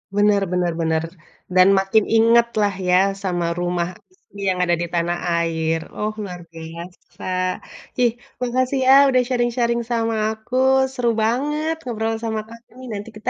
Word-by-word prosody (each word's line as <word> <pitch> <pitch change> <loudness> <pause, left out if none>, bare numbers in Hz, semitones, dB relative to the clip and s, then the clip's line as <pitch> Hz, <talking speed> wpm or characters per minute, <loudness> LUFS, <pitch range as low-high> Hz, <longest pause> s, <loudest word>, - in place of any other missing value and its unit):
Bener 205 -1 +3
bener 180 -1 0
bener, 160 0 0 0.5
dan 185 0 +7
makin 195 +2 +2
ingat 230 +1 +4
lah 205 -1 +2 0.2
ya 180 - +5 0.3
sama 175 -3 -1
rumah 175 -1 -1 0.2
isi 370 - -17
yang 180 -1 -1
ada 175 -1 +2
di 175 - -2
tanah 175 0 0 0.2
air, 165 -1 0 0.2
oh 215 0 -2
luar 180 -3 -7
biasa. 170 +2 -11 0.8
Ih 240 -1 +4 0.3
makasih 255 +2 0
ya 265 - +8 0.2
udah 255 -1 +4
sharing-sharing 240 -1 0
sama 230 -1 0 0.2
aku, 220 +3 -7 0.4
seru 245 -3 0
banget 295 +7 0
ngobrol 225 -2 -2
sama 220 -1 -2
kamu 230 +1 -15
nih, 255 - -9
nanti 205 +2 -6
kita 215 - -3
215 Hz, 155 wpm, -21 LUFS, 175-235 Hz, 0.8 s, ya